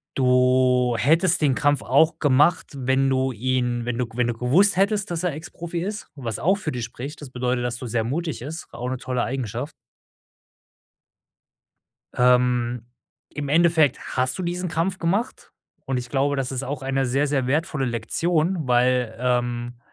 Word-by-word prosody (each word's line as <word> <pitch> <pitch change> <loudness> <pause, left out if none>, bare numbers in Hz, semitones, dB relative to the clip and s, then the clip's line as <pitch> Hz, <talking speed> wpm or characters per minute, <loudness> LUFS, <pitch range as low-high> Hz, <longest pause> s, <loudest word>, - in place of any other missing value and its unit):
Du 125 -1 +3
hättest 165 +7 +3
den 140 -4 +3
Kampf 145 0 +2
auch 155 +5 +3
gemacht, 150 +4 +3
wenn 135 0 +1
du 130 0 +1
ihn 125 0 -1
wenn 120 -1 -2
du 125 -2 -1
g 115 - -14
wenn 125 -1 +2
du 120 - 0
gewusst 145 - +3
hättest, 195 0 +1
dass 170 +1 -2
er 175 -5 0
Ex-Profi 165 +2 -6
ist, 210 +3 -5
was 120 -6 -4
auch 190 +4 +3
für 155 -6 -4
dich 125 -2 -4
spricht. 135 +6 -7
Das 145 - -8
bedeutet, 125 -1 -1
dass 120 -1 -2
du 125 - -7
sehr 115 -1 -1
mutig 155 +5 -3
ist, 155 +6 -7
auch 125 +1 -5
'ne 130 - -2
tolle 125 -1 -2
Eigenschaft. 130 +2 -4 2.4
Ähm, 125 -1 +2 0.4
im 145 -1 -5
Endeffekt 160 -3 +3 0.2
hast 130 +4 +1
du - - -2
diesen 180 +1 -3
Kampf 175 +4 -1
gemacht 195 +8 -2 0.3
und 135 -2 -1
ich 120 -1 -5
glaube, 140 +1 +1
das 135 -1 -2
ist 135 0 -3
auch 140 0 -4
eine 135 0 0
sehr, 135 +4 +1
sehr 135 -3 0
wertvolle 150 -1 0
Lektion, 160 - 0
weil, 125 -2 +2
ähm 120 -1 -1
130 Hz, 170 wpm, -23 LUFS, 125-160 Hz, 2.4 s, Du